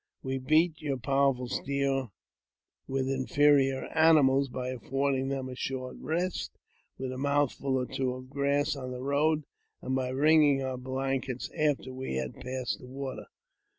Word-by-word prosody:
We 130 0 -2
beat 155 +3 +2
your 140 -3 -1
powerful 135 -1 +1
steed 135 0 -1 0.8
with 135 0 -1
inferior 135 0 +3
animals 145 -4 +5
by 125 0 -4
affording 135 +2 -1
them 135 -1 -2
a 130 - -6
short 130 0 -4
rest, 170 +5 -2 0.4
with 130 -1 -4
a 130 - -5
mouthful 140 -1 +1
or 125 - 0
two 130 0 -2
of 130 +1 -11
grass 140 +1 +1
on 130 -2 -6
the 125 0 -6
road, 150 +3 +2 0.4
and 130 - -3
by 130 -1 0
wringing 145 +1 +4
our 130 -1 -3
blankets 130 0 -3
after 145 -5 0
we 130 - -4
had 65 -1 -2
passed 130 -1 -4
the 125 - -12
water." 135 0 -6
135 Hz, 150 wpm, -29 LUFS, 130-140 Hz, 0.8 s, animals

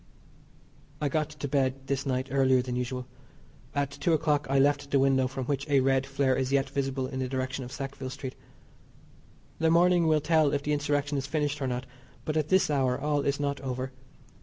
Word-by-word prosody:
I 145 - 0
got 155 +2 0
to 150 -1 -5
bed 135 -1 0
this 140 +1 -2
night 130 0 -1
earlier 130 -2 +3
than 125 -1 -4
usual. 125 0 -3 0.7
At 140 -1 0
two 170 +4 0
o'clock 150 -2 +1
I 135 - +2
left 140 +1 +2
the 140 - +3
window 135 -1 +3
from 130 0 -5
which 140 +2 -2
a 140 -1 +5
red 135 0 +2
flare 135 -1 +1
is 130 0 -1
yet 135 -1 +1
visible 135 -1 -1
in 130 0 -5
the 130 - -1
direction 130 +1 -3
of 125 - -8
Sackville 135 -1 -5
Street. 130 -1 -6 1.3
The 160 0 +3
morning 175 0 +4
will 155 -1 +4
tell 155 -1 +3
if 140 0 0
the 150 - 0
Insurrection 145 0 0
is 135 - -5
finished 150 0 -1
or 135 - 0
not, 125 0 -3 0.4
but 155 - -2
at 155 -1 +1
this 190 -4 +3
hour 130 -3 +1
all 145 0 0
is 140 0 0
not 140 -1 -2
over. 130 0 -3
140 Hz, 205 wpm, -28 LUFS, 130-145 Hz, 1.3 s, a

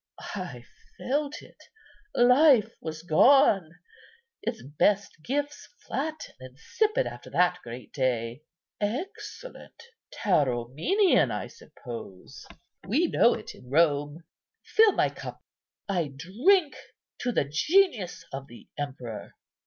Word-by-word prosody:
I 145 -12 -6 0.3
felt 290 +2 -2
it; - - -18 0.5
life 250 -3 +5
was 160 0 -6
gone; 195 - +5 0.7
its 230 -1 -4
best 175 +5 0
gifts 290 - -3 0.2
flat 310 +3 -3 0.2
and 130 0 -11
insipid 435 - 0
after - - -8
that 180 0 +2
great 120 -1 -10
day. 125 -1 -1 0.4
Excellent—Tauromenian, 280 - -1
I - - -3
suppose? 115 -7 -11 0.4
We - - +2
know - - +4
it - - -8
in 125 - -16
Rome. 145 +1 +1 0.4
Fill 445 0 +5
up - - -2
my - - +2
cup. - - -9 0.4
I 175 -7 -1
drink 280 - +2 0.4
to 245 - -1
the 185 - +1
genius 205 - +1
of 135 0 -6
the 120 - -15
emperor." 130 -6 -6
185 Hz, 110 wpm, -27 LUFS, -, 0.7 s, life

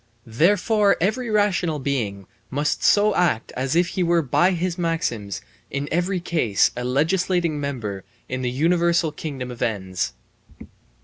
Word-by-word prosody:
Therefore 200 - +3
every 225 +7 0
rational 200 -7 +1
being 115 -9 -2 0.2
must 145 +3 -1
so 210 0 +4
act 170 -11 +1
as 130 +4 -1
if 175 +1 +3
he 185 - -2
were 170 -1 +3
by 170 +7 +3
his 175 0 -1
maxims 165 - -2 0.3
in 140 +1 -3
every 180 +3 0
case 155 - +1
a 125 - -4
legislating 165 +4 +1
member 115 -9 -4 0.2
in 130 0 -3
the 125 - -1
universal 170 +4 +2
kingdom 135 -5 -6
of 120 - -10
ends. 95 -5 -2
160 Hz, 140 wpm, -23 LUFS, 125-180 Hz, 0.3 s, so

